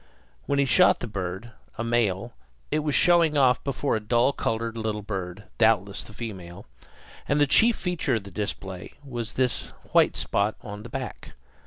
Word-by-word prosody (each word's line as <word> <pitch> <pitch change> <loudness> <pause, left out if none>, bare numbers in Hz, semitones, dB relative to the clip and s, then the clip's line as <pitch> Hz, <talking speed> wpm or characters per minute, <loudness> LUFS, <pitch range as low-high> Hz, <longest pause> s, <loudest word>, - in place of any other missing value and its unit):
When 140 - +1
he 140 - +3
shot 130 - +5
the - - -4
bird, 100 +1 -5 0.3
a - - -2
male, 115 -1 0 0.4
it 155 - +2
was 150 -2 0
showing 170 -3 +4
off 130 -3 +4
before 140 -1 -1
a - - 0
dull 120 +5 +2
colored 115 -1 -2
little 110 -2 -3
bird, 95 -1 -5 0.2
doubtless 105 -3 +3
the - - -12
female; 100 -5 -8 0.6
and 145 +2 +2
the 145 - +5
chief 225 - +5
feature 175 -8 -1
of 110 - -2
the 100 - -11
display 95 -2 -5
was 120 -4 -5
this 130 -1 0 0.2
white - - +4
spot 100 +2 0
on 105 0 -7
the 120 - -10
back. 130 +1 -6
115 Hz, 175 wpm, -26 LUFS, 100-135 Hz, 0.6 s, shot